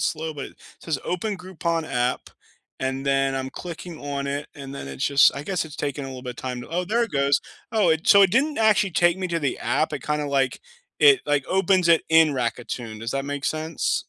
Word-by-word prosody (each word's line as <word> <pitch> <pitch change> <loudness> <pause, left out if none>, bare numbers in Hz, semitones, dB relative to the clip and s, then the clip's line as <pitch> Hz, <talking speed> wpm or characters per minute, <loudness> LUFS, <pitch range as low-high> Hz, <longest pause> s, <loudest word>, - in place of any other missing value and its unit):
slow, 160 0 -2
but 140 - -5
it - - -16 0.2
says, 155 -5 -2
"Open 200 +3 -2
Groupon 170 -3 -2
app," 125 -3 -1 0.5
and 135 +1 -2
then 135 -1 +2
I'm 130 0 -3
clicking 170 +1 -8
on 140 -1 -4
it, 140 +1 -3
and 140 -1 -8
then 105 - -7
it's 70 -1 -4
just 140 0 +5
I 140 - -5
guess 185 -1 -1
it's 150 - -10
taking 140 -1 -3
a - - -6
little 130 -1 -8
bit 125 - -5
of 125 - -10
time 125 -1 -5
to - - -11
oh, 180 +2 -1
there 235 +5 +1
it 230 - -11
goes. 140 0 +2 0.3
Oh, 210 -7 +3
it 160 +1 0
so 200 -1 +8
it 190 -2 +4
didn't 285 +4 +2
actually 215 -3 +3
take 175 +1 +3
me 185 -1 -3
to 170 - -1
the 140 -5 -1
app, 155 - 0
it - - -4
kinda, 150 -1 -1
like, 135 -2 0 0.4
it, 420 -4 +6
like, 145 -2 +1
opens 185 -1 +2
it 165 -1 +5
in 160 -1 +6
Rakuten, 120 -3 -3
does 115 +3 -4
that 135 0 -2
make 145 0 -4
sense? 155 0 -1
150 Hz, 235 wpm, -24 LUFS, 135-180 Hz, 0.5 s, so